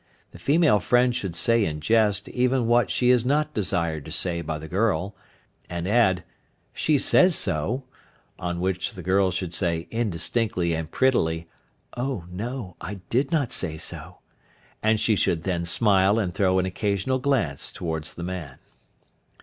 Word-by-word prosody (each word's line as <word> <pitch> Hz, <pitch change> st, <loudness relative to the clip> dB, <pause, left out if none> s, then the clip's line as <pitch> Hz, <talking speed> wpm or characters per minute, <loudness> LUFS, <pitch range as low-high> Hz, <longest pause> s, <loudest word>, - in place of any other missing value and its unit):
The -, -, -13 dB
female 150 Hz, -7 st, +3 dB
friend 125 Hz, +4 st, +2 dB
should 95 Hz, -8 st, -3 dB
say 115 Hz, +6 st, +2 dB
in 75 Hz, -5 st, -2 dB
jest 105 Hz, +3 st, +2 dB
even 125 Hz, 0 st, +1 dB
what 120 Hz, +1 st, +3 dB
she 125 Hz, 0 st, +3 dB
is 125 Hz, -2 st, +3 dB
not 150 Hz, +4 st, 0 dB
desired 85 Hz, -7 st, -1 dB
to -, -, -9 dB
say 85 Hz, -2 st, 0 dB
by 80 Hz, -1 st, -4 dB
the 80 Hz, +1 st, -9 dB
girl, 95 Hz, 0 st, 0 dB, 0.5 s
and 85 Hz, 0 st, -4 dB
add, 100 Hz, -5 st, +3 dB, 0.5 s
"she 155 Hz, -2 st, +2 dB
says 180 Hz, +5 st, +4 dB
so," 110 Hz, -, 0 dB, 0.6 s
on 85 Hz, 0 st, -3 dB
which 95 Hz, +6 st, -1 dB
the 95 Hz, -4 st, -9 dB
girl 95 Hz, +1 st, +2 dB
should 90 Hz, -1 st, -3 dB
say 85 Hz, -3 st, -1 dB
indistinctly 100 Hz, -3 st, 0 dB
and 80 Hz, -1 st, -3 dB
prettily, 85 Hz, -10 st, +1 dB, 0.5 s
"O 125 Hz, -7 st, -3 dB
no! 105 Hz, -1 st, -5 dB
I 100 Hz, +3 st, -5 dB, 0.2 s
did 135 Hz, +6 st, +1 dB
not 145 Hz, -7 st, 0 dB
say 80 Hz, -4 st, 0 dB
so," -, -, -6 dB, 0.6 s
and 110 Hz, 0 st, +2 dB
she 110 Hz, 0 st, +2 dB
should 85 Hz, -4 st, 0 dB
then 90 Hz, -2 st, -1 dB
smile 100 Hz, +2 st, +3 dB
and 95 Hz, -6 st, -1 dB
throw 95 Hz, -1 st, +2 dB
an 95 Hz, -, +2 dB
occasional 100 Hz, +6 st, -1 dB
glance 125 Hz, -, -1 dB
towards 80 Hz, -2 st, -4 dB
the 85 Hz, -, -6 dB
man. 85 Hz, -7 st, -6 dB
95 Hz, 160 wpm, -25 LUFS, 85-120 Hz, 0.6 s, says